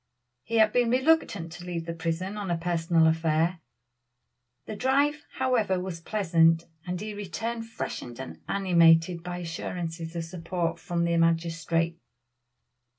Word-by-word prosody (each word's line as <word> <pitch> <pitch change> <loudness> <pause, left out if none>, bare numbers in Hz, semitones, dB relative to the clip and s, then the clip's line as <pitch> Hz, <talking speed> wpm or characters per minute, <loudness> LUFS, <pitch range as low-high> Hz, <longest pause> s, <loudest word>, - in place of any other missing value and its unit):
He 230 - -5
had 220 -1 +5
been 245 -1 +3
reluctant 255 - +2
to 175 - -9
leave 175 -2 -4
the 165 - -4
prison 165 +4 -3
on 205 -3 -4
a 170 - +1
personal 165 -1 +2
affair. 160 +2 +2 1.1
The 215 - -6
drive, 280 +6 +1
however, 235 -8 +1
was 180 -2 -5
pleasant, 165 -4 +3 0.2
and 180 0 -2
he 215 +1 -5
returned 225 +3 -4
freshened 120 - -6
and 130 - -8
animated 170 -3 +4
by 175 +1 -5
assurances 165 -1 -5
of 170 - -2
support 170 0 -3
from 170 -1 -1
the 170 0 +1
magistrate. 165 0 +1
175 Hz, 140 wpm, -27 LUFS, 165-205 Hz, 1.1 s, had